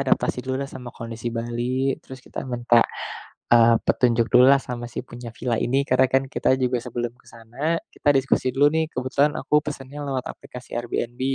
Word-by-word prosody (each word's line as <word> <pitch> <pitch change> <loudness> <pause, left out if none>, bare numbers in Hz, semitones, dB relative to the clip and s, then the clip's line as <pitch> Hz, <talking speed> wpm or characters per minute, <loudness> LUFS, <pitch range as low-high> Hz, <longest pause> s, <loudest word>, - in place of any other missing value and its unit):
adaptasi 130 -1 +1
dululah 130 +2 -3
sama 130 -2 -9
kondisi 115 +1 -5
Bali 120 +3 -1
terus 130 -1 -12
kita - - -6
minta, 120 -1 +3 0.7
eee, 115 0 +7
petunjuk 115 -2 +3
dululah 130 +3 +7
sama 120 -1 -6
si - - -3
punya 120 0 -8
villa 120 -1 -1
ini. 135 +3 +1
Karena 130 +1 +4
kan 135 0 +4
kita 130 - +2
juga 125 0 +1
sebelum 120 0 -4
ke - - -29
sana 120 +9 -3 0.2
kita - - -2
diskusi 135 -1 +1
dulu 145 +2 +5
nih, 160 0 +1
kebetulan 140 +3 +1
aku 150 - +3
pesennya 145 -1 -6
lewat 130 -2 -2
aplikasi 125 0 -12
Airbnb, 120 0 -4
125 Hz, 175 wpm, -23 LUFS, 120-135 Hz, 0.7 s, eee